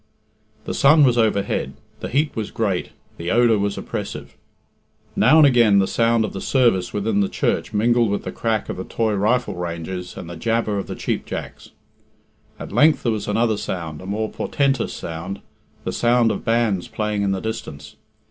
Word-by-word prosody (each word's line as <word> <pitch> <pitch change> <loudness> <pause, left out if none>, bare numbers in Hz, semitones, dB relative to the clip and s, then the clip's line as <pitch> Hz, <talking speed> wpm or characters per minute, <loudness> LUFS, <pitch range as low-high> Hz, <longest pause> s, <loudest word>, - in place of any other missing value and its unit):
The - - -3
sun 150 +2 +5
was 125 -3 +4
overhead, 100 - 0 0.2
the - - -5
heat 145 +4 0
was 110 -2 -3
great, 100 -6 -1 0.3
the 85 +1 -4
odour 115 -2 +4
was 100 0 -1
oppressive. - - -6 0.8
Now 155 - +5
and 155 - +8
again 120 -7 +5
the 100 - +4
sound 115 +1 +2
of - - -6
the 95 - -5
service 105 -10 +2
within 105 0 0
the 100 - +1
church - - -1
mingled 115 +2 +2
with 100 - -2
the - - -5
crack 110 -2 -1
of - - -5
the 95 - -4
toy 110 +1 -1
rifle 110 +5 +1
ranges 90 +1 -5
and 85 - -7
the 85 - -7
jabber 115 +2 -1
of 95 - -5
the - - -5
cheap - - -3
jacks. - - -7 0.9
At - - -8
length 155 +1 +4
there 120 - +1
was 105 -2 -3
another 110 +1 +1
sound 80 -6 -5
a 95 - -9
more 110 +2 -2
portentous 135 -3 0
sound 85 +4 -6 0.4
the - - -3
sound 120 -1 +3
of - - -4
bands 115 -6 +1
playing 105 -1 -2
in 100 -1 +1
the 95 - -1
distance. 110 -10 -6
110 Hz, 185 wpm, -21 LUFS, 95-120 Hz, 0.9 s, and